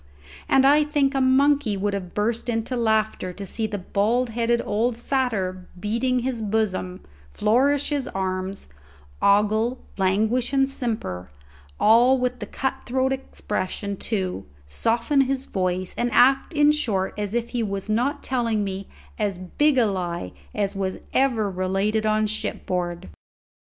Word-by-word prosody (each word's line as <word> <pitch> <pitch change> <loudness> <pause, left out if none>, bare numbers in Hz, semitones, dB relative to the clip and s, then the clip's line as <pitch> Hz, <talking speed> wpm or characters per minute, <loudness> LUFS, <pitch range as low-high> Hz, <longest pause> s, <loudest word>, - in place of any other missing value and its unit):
And 270 0 +5
I 295 +2 +6
think 290 -2 +1
a 270 - +1
monkey 260 -4 +3
would 200 +1 -1
have 185 -3 -5
burst 230 +3 -1
into 225 +2 -1
laughter 220 -5 0
to 200 +2 -7
see 220 +3 -2
the 205 -1 -4
bald 215 +6 0
headed 235 +1 +1
old 225 +3 0
satyr 215 -8 -1
beat 210 +4 -2 0.2
his 250 -3 -2
bosom, 200 -4 -1 0.3
flourish 260 - +2
his 285 -3 -1
arms, 190 0 -3 0.5
ogle, 215 +4 +3 0.2
languish, 220 +7 +1
and 270 -1 +3
simper, 215 - -4 0.5
all 240 +5 +5
with 250 0 -2
a - - -4
cut 265 0 -2
throat 260 +1 +1
expression, 205 -6 -4
too, 185 - -3 0.2
soften 230 - +1
his 270 0 -1
voice, 185 -1 -2
and 240 0 0
act 270 +7 +4
in 295 0 +5
short 210 -11 -1
as 210 +1 -3
if 235 0 -1
he 245 - -2
was 200 -2 -3
not 240 +7 0
telling 230 -5 0
me 195 0 -4 0.3
as 205 -3 -1
big 265 - +1
a 245 - +5
lie 175 - -3 0.2
as 200 0 -1
was 190 -1 -2 0.2
ever 245 -6 +2
related 195 +4 0
on 215 0 +2
shipboard. 180 - -3
220 Hz, 145 wpm, -24 LUFS, 195-255 Hz, 0.5 s, I